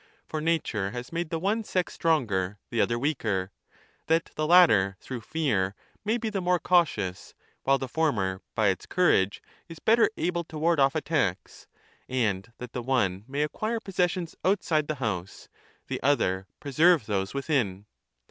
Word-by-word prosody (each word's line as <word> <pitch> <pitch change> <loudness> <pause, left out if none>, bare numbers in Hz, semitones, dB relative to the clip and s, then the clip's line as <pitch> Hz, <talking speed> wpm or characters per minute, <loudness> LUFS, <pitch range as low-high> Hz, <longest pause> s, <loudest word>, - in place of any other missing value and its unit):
For 155 - -4
nature 150 -11 0
has 120 +3 -7
made 170 -1 -2
the 165 - -1
one 205 +7 0
sex 185 -3 -1
stronger, 105 - 0
3 - - -7
the 115 - +3
other 120 - +1
weaker, 110 -9 -1 0.6
that 165 +1 +1
the 155 0 -1
latter 105 - +6
through 125 -3 -6
fear 105 -9 0 0.3
may 220 +3 +1
be 225 -2 -3
the 195 -2 -2
more 180 0 +2
cautious, 145 - 0 0.3
while 135 0 +4
the 135 - -4
former 105 -11 0
by 110 -2 +3
its 95 - -3
courage 100 - +2 0.3
is 165 - -9
better 225 +6 +4
1344* - - -4
able 175 -1 0
to 155 - -9
ward 165 +1 +2
off 135 0 +4
attacks; - - -2 0.4
and 115 -5 -1
that 125 -1 -9
the 125 - -3
one 105 -6 0
may 140 +2 -1
acquire 215 +9 -2
possessions 180 -4 -1
outside 165 -6 +1
the 155 - -2
house, 100 -8 -4 0.4
the - - -4
other 95 -9 +1
preserve 155 0 +3
those 100 +1 -2
within. 125 -9 -1
140 Hz, 165 wpm, -27 LUFS, 105-170 Hz, 0.6 s, latter